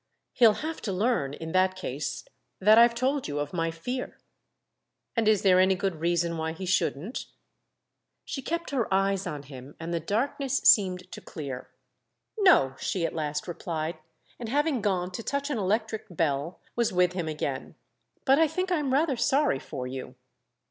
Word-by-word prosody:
"He'll 230 Hz, -3 st, +6 dB
have 320 Hz, 0 st, -4 dB
to 205 Hz, -, -3 dB
learn 185 Hz, -, 0 dB
in 160 Hz, +1 st, -6 dB
that 185 Hz, +1 st, +3 dB
case 150 Hz, -6 st, -4 dB, 0.4 s
that 215 Hz, +4 st, +7 dB
I've 235 Hz, 0 st, +6 dB
told 265 Hz, +3 st, 0 dB
you 145 Hz, -, -3 dB
of 145 Hz, +2 st, -3 dB
my 165 Hz, -2 st, 0 dB
fear." 245 Hz, +11 st, -5 dB, 1.0 s
"And 230 Hz, -2 st, +1 dB
is 215 Hz, -2 st, +4 dB
there 185 Hz, -2 st, +6 dB
any 190 Hz, +1 st, +4 dB
good 185 Hz, -2 st, -2 dB
reason 170 Hz, 0 st, 0 dB
why 160 Hz, 0 st, -2 dB
he 185 Hz, +3 st, -6 dB
shouldn't?" 185 Hz, -, -1 dB, 1.0 s
She 270 Hz, -, -4 dB
kept 335 Hz, +4 st, -3 dB
her 250 Hz, -7 st, -1 dB
eyes 195 Hz, 0 st, +1 dB
on 150 Hz, -4 st, -5 dB
him 135 Hz, 0 st, -11 dB
and 165 Hz, +1 st, -4 dB
the 170 Hz, -, 0 dB
darkness 260 Hz, -, -1 dB
seemed 185 Hz, -6 st, +4 dB
to -, -, -8 dB
clear. 135 Hz, -5 st, -7 dB, 0.7 s
"No!" 360 Hz, -, +5 dB
she 180 Hz, -3 st, -1 dB
at -, -, -2 dB
last 150 Hz, -1 st, -3 dB
replied, 165 Hz, -1 st, -4 dB, 0.4 s
and, 235 Hz, -2 st, -5 dB
having 290 Hz, -1 st, +1 dB
gone 185 Hz, -3 st, 0 dB
to 185 Hz, -, -5 dB
touch 280 Hz, +4 st, -2 dB
an 250 Hz, -, -1 dB
electric 215 Hz, +2 st, -1 dB
bell, 160 Hz, -1 st, -1 dB, 0.2 s
was 235 Hz, -1 st, +1 dB
with 180 Hz, -1 st, +3 dB
him 175 Hz, -3 st, -3 dB
again. 155 Hz, -1 st, -4 dB, 0.5 s
"But 270 Hz, +2 st, +5 dB
I 325 Hz, -, +5 dB
think 365 Hz, +4 st, -2 dB
I'm 300 Hz, -6 st, +1 dB
rather 285 Hz, -3 st, +2 dB
sorry 270 Hz, -, +2 dB
for 130 Hz, -1 st, -6 dB
you." 130 Hz, 0 st, -6 dB
185 Hz, 175 wpm, -27 LUFS, 160-245 Hz, 1.0 s, that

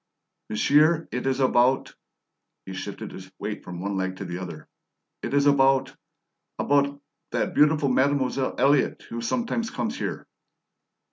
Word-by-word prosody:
"Monsieur, 150 Hz, +9 st, +3 dB
it 125 Hz, +2 st, -2 dB
is 135 Hz, 0 st, 0 dB
about" 130 Hz, 0 st, +3 dB, 0.7 s
he 95 Hz, -, -7 dB
shifted 90 Hz, -, -6 dB
his 95 Hz, 0 st, -10 dB
weight 105 Hz, 0 st, -5 dB
from 90 Hz, -1 st, -7 dB
one 100 Hz, +1 st, -2 dB
leg 95 Hz, 0 st, -2 dB
to 100 Hz, -, -7 dB
the 90 Hz, 0 st, -5 dB
other 85 Hz, -5 st, -8 dB, 0.5 s
"it -, -, -4 dB
is 140 Hz, 0 st, +3 dB
about 135 Hz, -2 st, +3 dB, 0.6 s
about 140 Hz, 0 st, +1 dB, 0.3 s
that -, -, -1 dB
beautiful 150 Hz, -1 st, +4 dB
Mademoiselle 135 Hz, 0 st, +1 dB
Elliott 140 Hz, 0 st, +2 dB
who 115 Hz, 0 st, -4 dB
sometimes 230 Hz, -, -1 dB
comes 225 Hz, +2 st, -3 dB
here." -, -, -4 dB
135 Hz, 140 wpm, -25 LUFS, 100-145 Hz, 0.7 s, beautiful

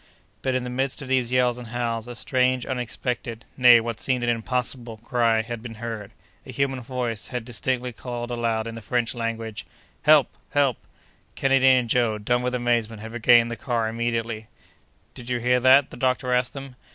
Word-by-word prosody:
But, 130 Hz, -1 st, 0 dB
in 130 Hz, -, 0 dB
the 125 Hz, -, -5 dB
midst 135 Hz, +3 st, -2 dB
of -, -, -8 dB
these 130 Hz, -2 st, +1 dB
yells 125 Hz, -1 st, +2 dB
and 120 Hz, -, -9 dB
howls, 115 Hz, -1 st, -3 dB
a 120 Hz, -, -7 dB
strange, 130 Hz, +1 st, +1 dB
unexpected—nay 125 Hz, -1 st, +2 dB
what 115 Hz, -1 st, -4 dB
seemed 125 Hz, -2 st, 0 dB
an 120 Hz, -, +2 dB
impossible—cry 115 Hz, -1 st, -1 dB
had 120 Hz, 0 st, -6 dB
been 115 Hz, -1 st, -8 dB
heard! 110 Hz, -2 st, -6 dB, 0.3 s
A -, -, -15 dB
human 135 Hz, 0 st, -1 dB
voice 120 Hz, -3 st, -3 dB
had, 125 Hz, -3 st, -5 dB
distinctly, 125 Hz, +1 st, -2 dB
called 120 Hz, +1 st, -6 dB
aloud 115 Hz, -2 st, -1 dB
in 115 Hz, -, -5 dB
the 115 Hz, -, -8 dB
French 120 Hz, +1 st, -1 dB
language— 115 Hz, -2 st, -4 dB, 0.4 s
"Help! 150 Hz, -2 st, +5 dB, 0.2 s
help!" 140 Hz, -5 st, +3 dB, 0.6 s
Kennedy 135 Hz, -1 st, +3 dB
and 130 Hz, -2 st, +5 dB
Joe, 115 Hz, -2 st, +2 dB
dumb 120 Hz, +4 st, 0 dB
with 125 Hz, 0 st, -1 dB
amazement, 115 Hz, -3 st, 0 dB
had 110 Hz, +1 st, -8 dB
regained 120 Hz, 0 st, +5 dB
the -, -, -3 dB
car 115 Hz, -1 st, -1 dB
immediately. 115 Hz, -1 st, -2 dB, 0.7 s
"Did 125 Hz, 0 st, -10 dB
you 125 Hz, -, +1 dB
hear 125 Hz, +1 st, +2 dB
that?" 130 Hz, +2 st, +5 dB
the -, -, -9 dB
doctor 130 Hz, -1 st, 0 dB
asked 125 Hz, 0 st, +1 dB
them. 135 Hz, -2 st, -9 dB
120 Hz, 180 wpm, -24 LUFS, 115-125 Hz, 0.7 s, Help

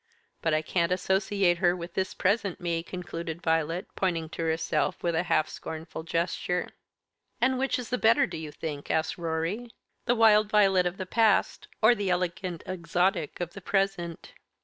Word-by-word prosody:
But 160 Hz, -2 st, +2 dB
I 155 Hz, -, 0 dB
can't 170 Hz, +1 st, 0 dB
associate 190 Hz, -1 st, +1 dB
her 175 Hz, -1 st, +3 dB
with 170 Hz, -1 st, -7 dB
this 190 Hz, 0 st, -2 dB
present 200 Hz, -1 st, 0 dB
me," 170 Hz, -2 st, -1 dB
concluded 170 Hz, -2 st, -6 dB
Violet, 165 Hz, +2 st, 0 dB
pointing 165 Hz, -4 st, -1 dB
to 165 Hz, -, -6 dB
herself 160 Hz, 0 st, 0 dB
with 170 Hz, -1 st, +1 dB
a 160 Hz, -, +2 dB
half 155 Hz, -, +3 dB
scornful 160 Hz, 0 st, -7 dB
gesture. 170 Hz, +2 st, -1 dB, 0.7 s
"And 255 Hz, +2 st, +2 dB
which 270 Hz, 0 st, +1 dB
is 250 Hz, -2 st, -6 dB
the 250 Hz, -, -1 dB
better, 230 Hz, +6 st, +5 dB
do -, -, -6 dB
you 155 Hz, -2 st, -6 dB
think," 150 Hz, -2 st, -6 dB
asked 160 Hz, +2 st, 0 dB
Rorie, 170 Hz, +8 st, -2 dB, 0.4 s
"the 245 Hz, -, +3 dB
wild 215 Hz, -2 st, +5 dB
Violet 195 Hz, -4 st, +4 dB
of 180 Hz, +2 st, -4 dB
the 185 Hz, -, -4 dB
past, 220 Hz, +1 st, +2 dB, 0.2 s
or 220 Hz, +3 st, +8 dB
the 205 Hz, -4 st, -2 dB
elegant 180 Hz, -1 st, -2 dB
exotic 175 Hz, -2 st, -1 dB
of 175 Hz, -1 st, -4 dB
the 200 Hz, -, -9 dB
present?" 195 Hz, -, -1 dB
180 Hz, 170 wpm, -28 LUFS, 165-200 Hz, 0.7 s, or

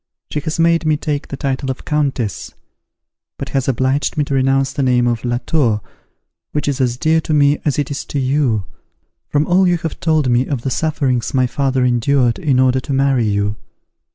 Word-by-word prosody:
She 150 Hz, -, -1 dB
has 155 Hz, +2 st, -4 dB
made 165 Hz, 0 st, +3 dB
me 155 Hz, -1 st, +2 dB
take 145 Hz, -1 st, -3 dB
the 140 Hz, -, -6 dB
title 135 Hz, 0 st, -2 dB
of 130 Hz, -, -5 dB
countess; 135 Hz, -, -2 dB, 0.8 s
but -, -, -5 dB
has 135 Hz, -2 st, -1 dB
obliged 130 Hz, +4 st, 0 dB
me 150 Hz, -, +2 dB
to 140 Hz, -, -4 dB
renounce 135 Hz, 0 st, +1 dB
the 145 Hz, -, -2 dB
name 125 Hz, -2 st, +2 dB
of 120 Hz, -2 st, -1 dB
LA 120 Hz, -1 st, 0 dB
TOUR, 120 Hz, -10 st, +1 dB, 0.7 s
which 150 Hz, -, -2 dB
is 140 Hz, -1 st, -1 dB
as 125 Hz, -1 st, 0 dB
dear 160 Hz, +3 st, +2 dB
to 155 Hz, -, -1 dB
me 145 Hz, 0 st, +3 dB
as 150 Hz, -, +1 dB
it 145 Hz, -1 st, -1 dB
is 140 Hz, -, -3 dB
to -, -, -4 dB
you, 130 Hz, -6 st, +1 dB, 0.6 s
from 145 Hz, +1 st, +1 dB
all 185 Hz, +2 st, +3 dB
you 175 Hz, -1 st, +2 dB
have 165 Hz, -1 st, -5 dB
told 155 Hz, -4 st, +1 dB
me 125 Hz, +1 st, +2 dB
of 135 Hz, -5 st, -3 dB
the 135 Hz, -, -2 dB
sufferings 135 Hz, -6 st, -1 dB
my 130 Hz, -1 st, +3 dB
father 130 Hz, 0 st, 0 dB
endured 125 Hz, 0 st, +2 dB
in 145 Hz, -8 st, +1 dB
order 130 Hz, 0 st, +3 dB
to 135 Hz, -, -5 dB
marry 135 Hz, -4 st, +2 dB
you. 100 Hz, +1 st, -1 dB
135 Hz, 205 wpm, -18 LUFS, 125-150 Hz, 0.8 s, made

